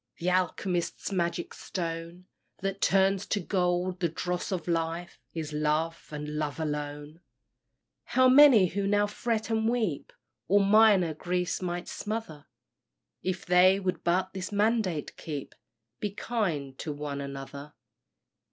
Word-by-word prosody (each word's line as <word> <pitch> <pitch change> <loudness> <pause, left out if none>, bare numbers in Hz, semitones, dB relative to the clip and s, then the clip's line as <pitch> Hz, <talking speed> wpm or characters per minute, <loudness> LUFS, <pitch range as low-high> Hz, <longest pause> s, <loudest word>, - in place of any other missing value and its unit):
Th' 170 - -6
alchemist's 180 0 0
magic 175 -2 -1
stone 170 0 -5 0.4
That 195 +1 -3
turns 195 0 +3
to 205 - 0
gold 180 -1 0
the 170 -2 +1
dross 180 +4 -3
of 180 -3 -3
life, 165 +1 -2 0.2
Is 155 -2 -4
love 155 +2 -1
and 150 0 -5
love 150 0 -3
alone. 150 0 -4 0.9
How 255 0 +4
many 255 -6 +8
who 195 +2 -1
now 205 +1 +3
fret 220 +1 -2
and 220 0 +2
weep 220 - -1 0.4
All 200 - +4
minor 200 -5 +5
griefs 180 +3 -2
might 175 -1 -3
smother, 210 -9 -5 0.7
If 185 -1 -3
they 185 +2 +5
would 185 -2 -2
but 185 +2 +1
this 190 0 -5
mandate 205 -6 0
keep, 145 -4 -6 0.5
"Be 210 - -1
kind 180 - -2
to 155 - -4
one 145 -1 -4
another." 140 +1 -7
180 Hz, 135 wpm, -28 LUFS, 155-200 Hz, 0.9 s, many